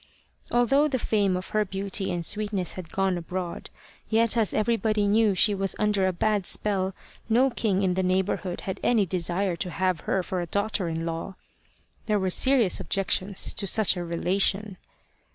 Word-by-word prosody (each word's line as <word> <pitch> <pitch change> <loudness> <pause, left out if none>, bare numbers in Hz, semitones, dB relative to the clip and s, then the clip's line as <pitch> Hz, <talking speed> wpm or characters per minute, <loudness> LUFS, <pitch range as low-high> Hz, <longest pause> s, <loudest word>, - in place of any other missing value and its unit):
Although 270 +5 +3
the 270 -3 -1
fame 200 -5 +1
of 185 - -7
her 215 0 +1
beauty 195 0 -3
and 175 -1 -2
sweetness 205 -3 -2
had 175 -4 -9
gone 190 -2 0
abroad, 175 +1 -5 0.4
yet 230 0 +3
as 225 -4 +2
everybody 215 -1 +1
knew 210 0 +3
she 210 +3 +4
was 195 -1 -1
under 210 -3 +1
a - - +1
bad 205 +1 0
spell, 195 -2 -2 0.3
no 255 +4 +3
king 200 -5 0
in 185 -1 +2
the 190 - 0
neighbourhood 185 0 -1
had 190 - -5
any 225 -5 +2
desire 180 +1 -1
to 180 - -4
have 185 -2 -1
her 190 - +1
for 180 0 -3
a 175 - -4
daughter 200 -1 -1
in 165 0 -3
law. 165 +3 -5 0.7
There 210 -1 +2
were 190 -2 0
serious 255 -3 +4
objections 195 0 0
to 200 - -2
such 215 0 +3
a 175 - -4
relation. 190 +3 0
195 Hz, 175 wpm, -26 LUFS, 185-215 Hz, 0.7 s, she